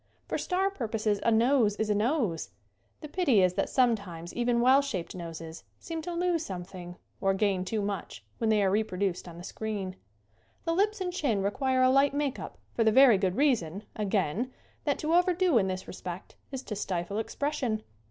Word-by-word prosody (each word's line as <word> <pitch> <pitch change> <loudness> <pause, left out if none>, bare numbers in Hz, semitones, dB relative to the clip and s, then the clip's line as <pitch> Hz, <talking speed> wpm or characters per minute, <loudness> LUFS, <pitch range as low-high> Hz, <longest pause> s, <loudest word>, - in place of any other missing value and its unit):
For - - -2
star 380 +2 0
purposes 220 - -1
a - - +2
nose 230 -1 +3
is 215 0 -1
a - - +4
nose. 210 - 0 0.5
The 305 - -6
pity 285 - +3
is 180 -1 +3
that - - -1
sometimes 200 -10 0
even 240 0 +1
well 260 +3 +6
shaped 230 -12 -4
noses 165 -2 -7
seem 330 -1 -5
to 350 +3 -5
lose 345 -2 +1
something 180 - -7 0.2
or 195 -1 +2
gain 195 -2 +1
too 210 +3 -2
much 200 - -5
when 225 - +1
they 210 -2 +4
are 190 - +3
reproduced 195 -3 -1
on 170 -1 -9
the 175 - -9
screen. 200 -2 -4 0.7
The 330 - +1
lips 410 +3 +1
and 360 -1 -2
chin 235 - 0
require 260 +5 +1
a 255 - +5
light 275 +1 +4
make 285 -2 -1
up - - -8 0.2
for 230 - +2
the 220 - +4
very 250 -4 +7
good 190 -2 0
reason, 215 - +1
again, 210 - 0 0.3
that 285 -2 +1
to 310 +2 -1
overdo 355 -5 +4
in 190 - +1
this 185 0 -4
respect 180 0 -7 0.2
is 265 -1 -5
to 210 - -5
stifle 195 0 -2
expression. 250 -3 -2
220 Hz, 190 wpm, -29 LUFS, 190-275 Hz, 0.7 s, very